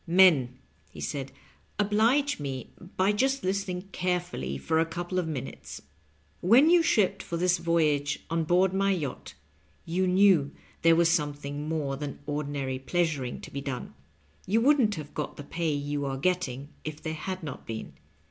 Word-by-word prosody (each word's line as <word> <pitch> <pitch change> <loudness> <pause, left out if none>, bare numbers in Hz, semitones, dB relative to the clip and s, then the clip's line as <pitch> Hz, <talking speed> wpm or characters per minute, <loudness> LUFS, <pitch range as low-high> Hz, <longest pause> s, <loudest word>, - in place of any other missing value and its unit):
"Men," 165 -9 +5 0.3
he - - -12
said, 135 -2 -4 0.5
"oblige 225 - +2
me 135 -3 -5 0.3
by 190 +2 +4
just 270 +6 +1
listening 185 -1 -1
carefully 175 - -2
for 160 - 0
a - - +5
couple 175 +2 -3
of 175 - -2
minutes. 135 -5 -6 0.6
When 250 - +6
you 350 -1 +6
shipped 215 - +2
for 170 - -4
this 180 +1 +2
voyage 150 -4 +1
on 165 0 0
board 180 +3 +3
my 195 +1 +2
yacht 155 -9 -3 0.5
you 185 +3 0
knew 180 -6 +4 0.3
there 165 0 +6
was 165 0 +4
something 145 -2 -2
more 145 -4 -1
than 145 -1 -5
ordinary 145 -3 -3
pleasuring 145 -4 -1
to - - -10
be 140 - -4
done. 135 -3 -5 0.6
Tou 225 - +4
wouldn't 255 -5 +4
have 150 -3 -8
got 150 - -4
the 145 - -7
pay 165 +2 -2
you 145 0 -2
are 135 0 -2
get 180 +5 +1
ting 135 -2 -5
if 155 -1 -6
there 160 0 -4
had 185 +3 -5
not 150 - -7
been. 110 -1 -6
165 Hz, 165 wpm, -28 LUFS, 145-185 Hz, 0.6 s, When